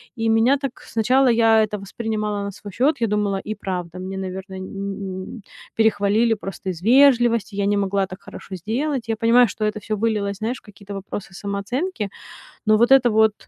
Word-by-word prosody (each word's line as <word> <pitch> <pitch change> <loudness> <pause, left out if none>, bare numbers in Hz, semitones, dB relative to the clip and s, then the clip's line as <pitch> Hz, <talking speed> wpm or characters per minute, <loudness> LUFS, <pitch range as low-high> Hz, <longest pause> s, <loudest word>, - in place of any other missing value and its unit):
И 225 -2 0
меня 225 +5 +4
так 275 -2 -6
сначала 255 +4 +2
я 225 -1 +5
это 210 -1 -3
воспринимала 210 0 -3
на 200 - -4
свой 205 +1 -10
счёт. 275 - +1
Я 230 - +3
думала: 205 -2 0
и 215 - -2
правда, 180 -2 -5
мне, 190 +1 -5
наверное, 190 0 -6
не 190 - -7
н 195 -1 -5
н - - -11 0.3
перехвалили 220 +1 +3
просто 195 -2 -6
из 175 -2 -5
вежливости. 240 -3 +4
Я 200 - 0
не 205 0 +2
могла 195 -1 +1
так 185 0 -10
хорошо 190 - -9
сделать. 240 - -2
Я 225 - +1
понимаю, 235 +2 +5
что 215 +1 -3
это 210 0 -1
всё 215 +1 -3
вылилось, 205 -2 -1
знаешь, 230 +4 -2
в - - -37
какие-то 200 -1 -12
вопросы 195 0 -7
самооценки, 205 - -3 0.6
но 215 0 +5
вот 235 +4 +3
это 265 -2 +7
вот, 220 0 +4
210 Hz, 195 wpm, -22 LUFS, 195-230 Hz, 0.6 s, это